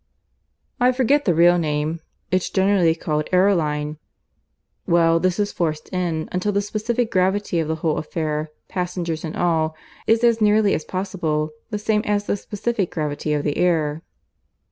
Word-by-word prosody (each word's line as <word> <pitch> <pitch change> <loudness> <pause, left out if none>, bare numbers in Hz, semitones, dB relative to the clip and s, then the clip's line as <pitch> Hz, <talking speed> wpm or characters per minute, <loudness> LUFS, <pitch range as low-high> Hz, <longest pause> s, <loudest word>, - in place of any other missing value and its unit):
"I 250 +1 +4
forget 275 +3 +2
the 175 - +2
real 175 +2 +5
name. 155 +1 -1 0.3
It's 185 -1 +1
generally 190 -4 +3
called 155 -2 -2
aeroline. 155 -6 +1 0.9
Well, 165 -1 +4
this 185 0 +1
is 205 -1 0
forced 155 -4 -2
in, 170 -4 -1
until 185 +3 0
the 200 0 0
specific 220 +3 -1
gravity 190 -1 +1
of 160 - -1
the 160 - -1
whole 155 - +1
affair, 155 -1 -3 0.2
passengers 175 -3 -3
and 160 -1 -5
all, 160 -2 +1 0.3
is 225 +1 +3
as 230 -1 +3
nearly 210 -1 +4
as 155 - -2
possible 170 -5 -2 0.2
the 210 - -2
same 210 0 +1
as 205 0 0
the - - 0
specific 205 0 -2
gravity 150 -1 -3
of 145 -1 0
the 145 - -1
air." 160 -3 +1
175 Hz, 160 wpm, -22 LUFS, 155-205 Hz, 0.9 s, real